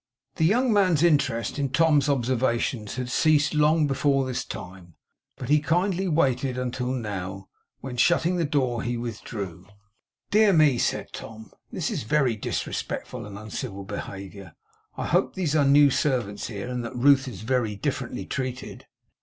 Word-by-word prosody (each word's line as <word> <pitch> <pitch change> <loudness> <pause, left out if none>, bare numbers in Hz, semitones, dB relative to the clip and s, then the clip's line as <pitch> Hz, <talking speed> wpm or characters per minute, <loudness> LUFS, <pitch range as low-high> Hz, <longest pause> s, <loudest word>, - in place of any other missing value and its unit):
The 160 - +2
young 235 +6 +3
man's 185 -6 +3
interest 145 -7 +1
in 140 -1 0
Tom's 150 0 +3
observations 120 -4 0
had 125 -1 -3
ceased 155 0 +3
long 150 +1 +3
before 135 -1 +1
this 130 -1 -3
time, 90 -2 -9 0.4
but - - -6
he 150 +1 +4
kindly 180 +5 0
waited 135 -5 +1
until 125 0 -2
now; 95 -6 -5 0.3
when, 125 -2 -6
shutting 175 +6 +3
the 170 - +1
door, 130 -6 0
he 120 0 -2
withdrew. 100 -6 -6 0.6
'Dear 210 -1 +5
me!' 150 -7 +4
said - - -1
Tom. 110 -1 -9 0.2
'This - - -2
is - - -2
very 125 +1 +1
disrespectful 105 - -4
and 100 -1 -9
uncivil 105 -1 -6
behaviour. 95 -2 -8 0.4
I - - -3
hope - - +1
these 165 -5 -1
are 145 -2 +4
new 140 0 +6
servants 120 -8 -1
here, 105 0 -6
and 125 -1 -3
that 115 +2 -6
Ruth 135 +2 +4
is 105 -8 -7
very 115 -2 0
differently 100 - -3
treated. 130 -1 -5
130 Hz, 155 wpm, -25 LUFS, 110-150 Hz, 0.6 s, new